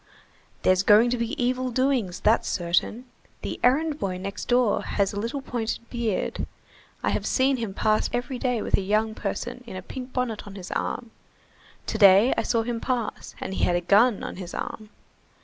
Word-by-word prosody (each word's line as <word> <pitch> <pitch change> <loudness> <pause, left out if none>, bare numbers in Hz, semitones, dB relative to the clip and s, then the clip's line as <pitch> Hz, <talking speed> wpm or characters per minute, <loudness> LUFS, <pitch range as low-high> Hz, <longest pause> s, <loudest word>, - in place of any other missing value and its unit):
"There's 185 0 +4
going 215 +4 +5
to 250 - +1
be 235 0 -3
evil 255 +1 0
doings, 250 -7 0
that's 220 +2 +3
certain. 180 +7 0 0.4
The - - -4
errand 295 +4 +3
boy 185 -2 -2
next 195 +2 -5
door 245 -3 +3
has 200 -1 -1
a 205 - -3
little 235 +6 -3
pointed 235 -2 -3
beard, 235 -5 -2 0.6
I - - +1
have - - -1
seen 265 0 +2
him 225 -5 -4
pass 215 0 +2
every 245 +1 -3
day 245 -4 0
with - - +2
a - - -1
young 215 +3 +1
person 240 +4 -4
in 205 - -7
a 185 - -6
pink 255 +5 -7
bonnet 240 -5 -2
on 200 - -9
his 185 -2 -8
arm; 235 -2 -3 0.7
to - - -3
day 200 +4 +7
I - - +1
saw 230 -2 +1
him 235 0 -3
pass, 245 -4 -3
and - - -4
he - - -2
had 175 - +3
a 175 - +1
gun 205 +5 +4
on - - -6
his 180 -2 -7
arm. 215 -1 -5
225 Hz, 195 wpm, -25 LUFS, 200-250 Hz, 0.7 s, day